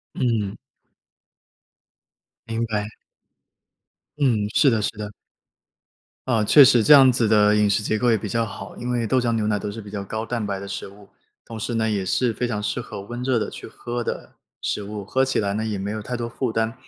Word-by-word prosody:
嗯。 110 -4 -1 1.9
明 115 +1 -1
白。 105 -1 -2 1.3
嗯， 110 -7 +2
是 140 -1 +5
的， 110 -3 +1
是 - - 0
的。 105 -1 -5 1.2
啊， 115 -4 +2
确 140 +7 +8
实 120 -4 +5
这 150 - +7
样 135 -2 +8
子 120 -2 +2
的 105 -1 +4
饮 105 -1 +3
食 100 +1 +2
结 110 +1 0
构 120 +2 +2
也 110 - +3
比 105 - -5
较 115 +3 0
好， 100 -1 -9
因 125 - -5
为 120 -2 0
豆 130 - +2
浆 120 -2 +1
牛 110 -2 0
奶 105 -1 +1
都 105 0 -4
是 115 - -8
比 105 -1 -9
较 100 -1 -5
高 110 +3 -4
蛋 115 -2 -3
白 100 -1 -3
的 100 - -7
食 100 - -6
物。 100 0 -17 0.4
同 115 - -8
时 115 +2 -3
呢， 110 -1 +1
也 100 -3 -1
是 120 +4 +1
非 125 - -2
常 105 -3 -2
适 120 - -2
合 100 - -8
温 120 +5 -6
热 130 -3 +1
地 - - -3
去 - - -9
喝 120 0 -5
的 - - -5 0.3
食 105 - -2
物， 105 -1 -7
喝 130 +6 +1
起 135 - 0
来 100 -1 -1
呢 110 +2 -2
也 105 -2 -2
没 100 +1 -4
有 110 0 -4
太 125 +3 -4
多 120 -1 -3
负 120 0 -3
担。 115 0 -1
110 Hz, 240 characters per minute, -23 LUFS, 105-120 Hz, 1.9 s, 确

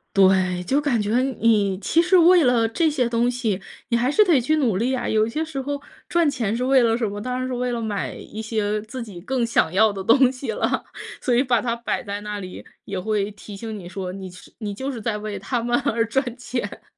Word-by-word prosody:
对， 185 -2 +4
就 270 +10 +1
感 275 -7 +1
觉 210 +3 +1 0.2
你 210 -4 +3
其 205 - +1
实 355 +2 +4
为 350 0 +6
了 245 -3 +3
这 315 +9 +1
些 260 -6 +1
东 235 +1 +2
西， 225 -6 -1 0.3
你 235 - +2
还 250 +4 +1
是 425 - +5
得 340 -8 +4
去 310 +6 +1
努 235 -10 +1
力 240 +6 0
呀， 260 - -1
有 215 0 +3
一 - - -4
些 305 +7 -2
时 315 -4 -5
候 285 +1 -3 0.3
赚 340 -3 +2
钱 225 -6 -1
是 245 - -2
为 260 0 +4
了 225 -1 +3
什 230 -3 -1
么？ 205 +1 -6
当 250 +4 -3
然 255 - -2
是 255 - -3
为 245 0 -1
了 235 -1 -2
买 205 -3 -3
一 215 - -9
些 215 -1 -1
自 250 +4 -7
己 205 -7 -8
更 260 +2 -1
想 230 -7 +1
要 215 +2 +4
的 195 -1 -6
东 255 +5 +5
西 265 +1 -5
了， - - -1 0.4
所 250 - 0
以 245 - +4
把 250 -4 +2
它 235 0 -1
摆 235 +2 -3
在 205 -2 -5
那 210 0 -5
里， 185 -2 -8 0.2
也 195 -2 -4
会 210 +1 -1
提 205 0 -10
醒 220 0 -6
你 175 -2 -9
说， 185 -1 -5
你 190 -1 -7
是 180 0 -15
你 210 -2 -4
就 265 +7 -4
是 240 -4 -6
在 215 -1 -1
为 210 -1 -5
它 230 +5 -2
们 240 0 +1
而 230 0 0
赚 245 +1 -1
钱。 250 0 -5
230 Hz, 270 characters per minute, -23 LUFS, 205-255 Hz, 0.4 s, 为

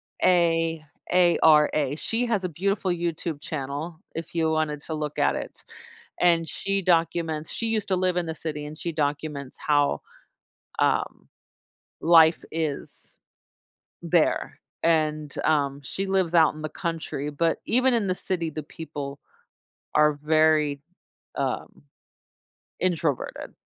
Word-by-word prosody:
V-A-A-R-A. 165 -3 +2
She 225 +9 -1
has 220 -5 0
a 185 - -1
beautiful 190 +3 -1
YouTube 170 -3 -2
channel 155 +3 -5 0.2
if 165 -1 -6
you 165 -2 +1
wanted 155 -2 0
to 160 - -6
look 150 -1 -4
at - - +3
it, - - -7 0.6
and 170 -2 +4
she 195 0 -1
documents 165 -3 +1
she 230 - -2
used 220 -2 -1
to 190 - +3
live 180 -1 +1
in 175 - 0
the 160 - -4
city 150 -2 -5
and 150 +1 -8
she 170 - -3
documents 145 -2 -3
how, 145 - +2 0.8
um, - - 0 0.7
life 165 -1 +6
is 155 -3 -4 0.9
there, - - +1 0.2
and, 155 -3 +1
um, 140 -2 +1
she 195 +8 -4
lives 190 -3 +1
out 160 -3 +6
in 155 - -9
the 155 - -3
country, 160 -4 -4
but 165 +3 +1
even 255 +2 +3
in 225 - +1
the 185 - 0
city 175 -3 -2
the 155 -1 -5
people 145 -3 -7 0.8
are 150 0 +5
very, 150 -1 +2 0.6
um, - - -2 1.1
introverted, 165 -6 -1
160 Hz, 130 wpm, -25 LUFS, 150-175 Hz, 1.1 s, life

